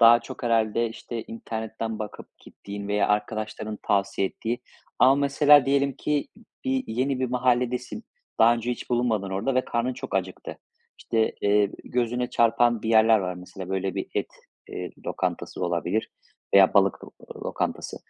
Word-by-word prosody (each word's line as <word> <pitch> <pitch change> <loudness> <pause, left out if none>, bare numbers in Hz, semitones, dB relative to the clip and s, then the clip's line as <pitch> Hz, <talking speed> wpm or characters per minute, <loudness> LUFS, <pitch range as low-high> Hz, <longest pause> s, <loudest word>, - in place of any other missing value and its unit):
daha 115 +1 +8
çok 115 - -10
herhâlde, 115 0 +2
işte, 115 0 -6
internetten 110 -1 -5
bakıp 105 -1 -8
gittiğin 100 0 -9
veya 105 0 +1
arkadaşların 110 0 -2
tavsiye 100 -1 +1
ettiği 120 +2 -4 0.4
ama 135 +1 +6
mesela 145 0 +5
diyelim 140 0 +2
ki 150 +2 -1 0.4
bir, 265 0 0
yeni 130 +3 -1
bir 130 - +1
mahalledesin, 125 0 0 0.3
daha 115 +1 +6
önce 120 +1 -3
hiç 125 - -6
bulunmadın 115 -5 0
orada 100 +8 -1
ve 130 - +2
karnın 120 +2 -1
çok 125 - -7
acıktı. 95 -1 -3 0.4
İşte, 110 -1 0
eee, 100 0 +3
gözüne 125 0 -1
çarpan 115 0 +3
bir 110 - -3
yerler 110 0 +6
var, 90 -2 -3
mesela, 90 +1 -9
böyle, 95 0 -2
bir - - -3
et, - - 0 0.4
eee, - - -5 0.2
lokantası - - -3
olabilir - - -1 0.4
veya - - +7
balık - - +3
lo - - -13 0.3
lokantası. - - -3
115 Hz, 155 wpm, -25 LUFS, 105-125 Hz, 0.4 s, daha